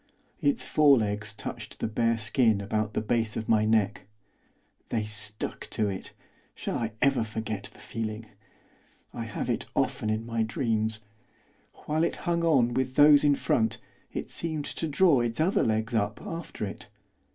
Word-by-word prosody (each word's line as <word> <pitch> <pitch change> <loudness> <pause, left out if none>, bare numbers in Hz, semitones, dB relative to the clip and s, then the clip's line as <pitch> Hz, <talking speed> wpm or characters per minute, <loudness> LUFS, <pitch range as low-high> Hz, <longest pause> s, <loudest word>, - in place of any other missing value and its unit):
Its 285 -5 +1
forelegs 110 -8 +3
touched 105 - -7
the - - -1
bare 115 +1 +1
skin 110 -1 +2
about 105 +1 -2
the - - +1
base 110 0 0
of 110 - -4
my 110 -1 +4
neck; 110 -3 +1 0.8
they 110 -2 0
stuck 105 0 -5
to 105 -2 0
it, 95 -1 -6 0.4
shall - - -3
I 115 -2 -2
ever 135 -4 +3
forget 110 -2 -4
the - - -19
feeling? 110 0 -5 0.9
I - - -4
have - - -4
it - - -1
often 110 - 0
in 110 +1 -1
my 115 -1 -1
dreams. 110 -1 0 0.8
While 155 +2 +1
it - - 0
hung 170 -1 +1
on 130 -8 +3
with 130 0 -1
those 145 0 +7
in 145 -1 +5
front 110 -4 +1 0.3
it - - -5
seemed 155 -3 -2
to 165 - -3
draw 155 -1 +4
its 120 +2 -2
other 175 +5 +3
legs 110 +1 0
up 105 -1 0
after 165 -9 -5
it. 100 - -8
115 Hz, 165 wpm, -28 LUFS, 110-140 Hz, 0.9 s, those